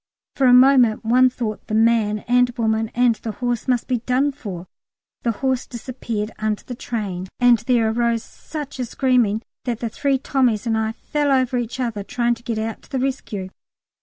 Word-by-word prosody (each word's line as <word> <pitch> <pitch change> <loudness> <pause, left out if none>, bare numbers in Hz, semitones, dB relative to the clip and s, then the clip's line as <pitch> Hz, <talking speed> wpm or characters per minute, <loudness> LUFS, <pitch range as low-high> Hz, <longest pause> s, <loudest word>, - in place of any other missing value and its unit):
For 270 - +3
the 245 - +7
moment 250 -4 +5
one 255 +3 +5
thought 230 -4 -5
the 215 - -2
man 220 -2 +2
and 245 +1 +4
woman 220 -1 0
and 245 -1 +4
the 220 0 -5
horse 245 0 -2
must 250 -2 +1
be 250 -2 0
done 255 +5 +1
for; 200 -11 -7 0.6
the 235 - -1
horse 260 +3 -1
disappeared 230 -3 -5
under 215 -1 -1
the 250 - -7
tram, 205 -7 -4
and 245 -2 +5
there 235 0 +2
arose 235 0 0
such 295 -4 -8
a 250 - -1
screaming 240 -4 +1 0.2
that 240 -3 -2
the 230 - -2
three 275 +4 0
Tommies 250 -5 +1
and 225 -1 +1
I 220 0 -1
fell 290 +4 -1
over 260 -2 +2
each 245 +1 -3
other 230 -5 -2
trying 240 +3 0
to 235 - -9
get 235 -2 -3
out 220 0 -3
to - - -21
the 270 - -2
rescue. 250 -7 -3
235 Hz, 195 wpm, -21 LUFS, 220-255 Hz, 0.6 s, the